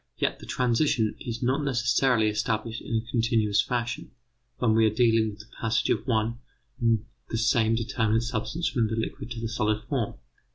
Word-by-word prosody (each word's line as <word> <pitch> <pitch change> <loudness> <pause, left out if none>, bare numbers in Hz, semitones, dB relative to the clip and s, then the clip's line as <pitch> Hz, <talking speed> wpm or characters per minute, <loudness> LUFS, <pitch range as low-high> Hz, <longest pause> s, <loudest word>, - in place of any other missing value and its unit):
Yet - - 0
the - - -11
transition 120 -3 +1
is 115 -1 -5
not 135 +4 +1
necessarily 120 -2 +2
established 110 +1 -1
in 115 - -4
a 115 +2 -2
continuous 110 -4 +2
fashion 120 0 -3 0.5
when 115 -3 +2
we 110 0 +5
are 110 - -1
dealing 115 -2 +3
with 105 0 -9
the 105 - -19
passage 115 -1 +1
of - - -1
one 115 0 0 0.4
and 115 -2 +2 0.2
the 115 - -2
same 115 -1 +3
determinate 115 0 +1
substance 120 +8 -2
from 115 -5 +1
the 110 - -2
liquid 115 +1 -4
to 120 -2 -5
the 115 - -2
solid 110 -1 0
form. 125 -7 -2
115 Hz, 180 wpm, -27 LUFS, 110-120 Hz, 0.5 s, we